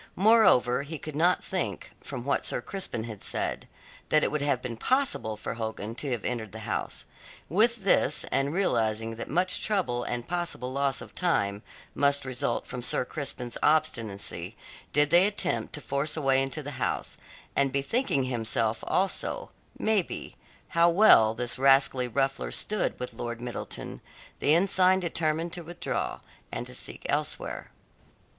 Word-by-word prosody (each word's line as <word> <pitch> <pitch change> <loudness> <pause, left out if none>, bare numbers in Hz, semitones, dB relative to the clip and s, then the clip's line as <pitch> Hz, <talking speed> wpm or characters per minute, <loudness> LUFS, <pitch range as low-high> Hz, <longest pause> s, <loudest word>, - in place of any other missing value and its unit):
Moreover, 190 - +5
he 150 +3 -6
could 155 +1 -8
not 175 +4 +3
think, 185 -2 -3
from 130 -3 -6
what 140 - +1
Sir - - 0
Crispin 120 - -3
had 110 -3 -8
said, - - -2 0.4
that 155 - +4
it - - +1
would 150 - -1
have 140 -3 +1
been 125 -2 -5
possible 120 - +1
for - - -5
Hogan 110 -1 -5
to 140 +4 -3
have 120 -5 -3
entered 110 -5 -3
the - - -6
house. - - -3 0.4
With 220 - +2
this, 150 -6 +4
and 135 +1 +1
realizing 115 - 0
that - - -6
much 180 +5 +2
trouble 155 - 0
and 120 0 -4
possible 170 -8 -2
loss 140 -1 0
of - - -11
time 105 - 0 0.3
must 140 -1 +2
result 125 -2 -2
from 125 -1 -6
Sir 125 - +1
Crispin's 125 -4 -4
obstinacy, 115 - 0 0.3
did 145 0 +3
they 175 +3 +6
attempt 200 -6 -1
to 150 - -2
force 140 +3 0
a - - -2
way 135 0 +4
into 135 +3 -3
the 145 - -6
house, - - -2 0.4
and 140 -1 +2
bethinking 140 - +1
himself, 115 -2 -1
also, 195 - -1 0.3
maybe, 215 -5 -1 0.3
how 170 +1 +4
well 165 - +6
this 120 +1 -2
rascally 135 -1 +4
ruffler 135 +2 -1
stood 210 -1 -1
with 125 - -5
Lord 120 -1 -5
Middleton, 120 0 -6 0.4
the 150 - +4
ensign 185 +1 +4
determined 165 -1 -1
to 175 - -3
withdraw, 170 +2 -4 0.3
and - - -4
to - - -6
seek - - -4
elsewhere. - - -2
140 Hz, 160 wpm, -28 LUFS, 120-175 Hz, 0.4 s, they